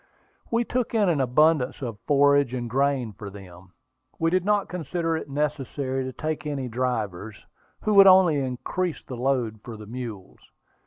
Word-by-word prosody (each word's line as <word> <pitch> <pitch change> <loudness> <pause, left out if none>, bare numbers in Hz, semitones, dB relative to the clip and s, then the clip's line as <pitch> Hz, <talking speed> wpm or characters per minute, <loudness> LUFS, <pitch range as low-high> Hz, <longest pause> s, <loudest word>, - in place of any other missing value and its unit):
We 230 +1 +1
took 245 -1 -2
in 205 -4 +3
an 155 -5 +1
abundance 135 +1 +2
of 115 -4 -5
forage 140 -3 +4
and 120 -1 -3
grain 130 -2 0
for 100 +1 -8
them. 90 -2 -13 0.4
We 165 0 +1
did 185 0 +2
not 205 0 +1
consider 170 -1 -2
it 160 - -5
necessary 140 -2 -2
to 130 - -4
take 155 +4 -4
any 140 -3 -3
drivers, 110 -5 -3 0.4
who 215 - 0
would 195 -1 +8
only 185 -5 +6
increase 140 +7 -3
the 130 - -7
load 120 -3 -1
for 115 -2 -8
the 105 - -10
mules. 115 -4 -8
135 Hz, 165 wpm, -25 LUFS, 120-165 Hz, 0.4 s, would